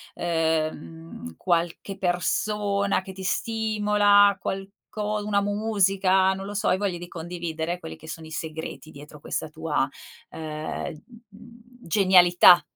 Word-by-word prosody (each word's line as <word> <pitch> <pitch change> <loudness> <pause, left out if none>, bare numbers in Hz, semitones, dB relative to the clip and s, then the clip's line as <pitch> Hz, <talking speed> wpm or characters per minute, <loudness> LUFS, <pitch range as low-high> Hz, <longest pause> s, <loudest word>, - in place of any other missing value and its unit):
ehm, 165 +5 -2
qualche 175 +2 -1
persona 200 +3 0
che 190 0 -10
ti 190 0 -8
stimola, 205 0 +3
qualco 210 +2 -4
una 205 -1 +1
musica, 195 -2 +2
non 195 0 -6
lo 205 - -6
so, 205 - -1
hai 185 - +3
voglia 195 -3 -1
di 175 0 -8
condividere, 170 0 -4
quelli 160 - -8
che 160 - -13
sono 160 -1 -7
i - - -13
segreti 160 -1 -6
dietro 145 +1 -13
questa - - -3
tua, - - -1 0.4
ehm, 155 0 -5 0.3
mhmm, 235 +3 -16 0.2
genialità? 180 -3 +6
190 Hz, 125 wpm, -25 LUFS, 165-205 Hz, 0.4 s, genialità